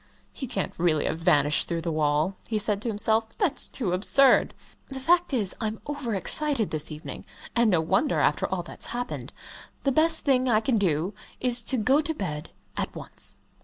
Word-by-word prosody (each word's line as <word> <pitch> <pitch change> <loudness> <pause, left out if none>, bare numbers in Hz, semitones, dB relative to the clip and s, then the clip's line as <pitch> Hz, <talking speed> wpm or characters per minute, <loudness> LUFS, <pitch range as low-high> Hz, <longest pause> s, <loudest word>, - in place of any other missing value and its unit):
"He 265 - -6
can't 205 -6 -3
really 165 -3 +1
have 160 - -2
vanished 150 -4 +2
through 170 -1 -2
the 165 0 -3
wall," 155 +4 0
he 220 - -1
said 205 -1 0
to 235 - -4
himself. 220 +1 0
"That's 370 -9 0
too 220 -9 -3
absurd. 255 +9 +4 0.3
The 270 -1 -6
fact 345 +6 +2
is, 215 -8 0
I'm 220 0 -3
over 285 -7 -4
excited 270 - +2
this 155 0 -3
evening 155 +1 -8 0.3
and 235 -2 +4
no 175 -5 +3
wonder, 165 -1 +1
after 150 0 +1
all 185 -2 -3
that's 170 - -8
happened. 245 +1 -5 0.5
The 275 - +2
best 320 +3 +4
thing 260 -2 +2
I 215 -2 +4
can 225 +1 0
do 175 0 0 0.3
is 245 -1 +1
to 260 - +1
go 260 +7 +3
to 320 +1 -3
bed 150 - -5 0.3
at - - -4
once." - - 0
215 Hz, 190 wpm, -26 LUFS, 170-260 Hz, 0.5 s, absurd